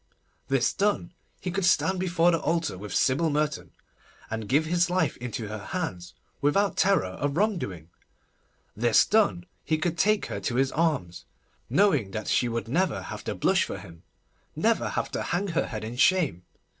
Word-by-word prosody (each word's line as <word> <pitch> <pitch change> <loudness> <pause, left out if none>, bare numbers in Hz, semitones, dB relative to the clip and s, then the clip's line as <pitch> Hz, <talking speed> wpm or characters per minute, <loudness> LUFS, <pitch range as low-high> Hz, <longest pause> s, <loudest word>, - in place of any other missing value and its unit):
This 135 -2 +1
done, 200 -4 0 0.3
he 180 - -4
could 195 +2 -2
stand 185 +1 +3
before 175 -1 +3
the 165 - +1
altar 165 - 0
with 100 +3 -8
Sybil 140 +5 +2
Merton, 150 0 -1 0.6
and 110 -2 -4
give 145 +5 +3
his 175 +2 +1
life 185 +1 +1
into 120 -2 -5
her 110 +1 -5
hands 90 -2 -5 0.3
without 195 +8 +2
terror 195 - +3 0.2
of 145 +2 -1
wrongdoing. 100 - -1 0.8
This 115 +1 +4
done, 205 -5 +2 0.2
he 155 - 0
could 165 +1 -2
take 215 +1 +3
her - - -4
to 120 - -3
his 135 +1 +2
arms, 140 - -1 0.4
knowing 150 - +3
that 110 +2 -5
she 120 - +2
would 115 -1 -3
never 170 +6 0
have - - -7
to - - -3
blush - - +2
for - - -5
him, 85 -4 -12 0.5
never - - +1
have - - -2
to - - -2
hang 180 +5 -1
her 170 0 0
head 110 - -5
in 115 +3 -6
shame. 140 - +2
150 Hz, 175 wpm, -27 LUFS, 115-180 Hz, 0.8 s, This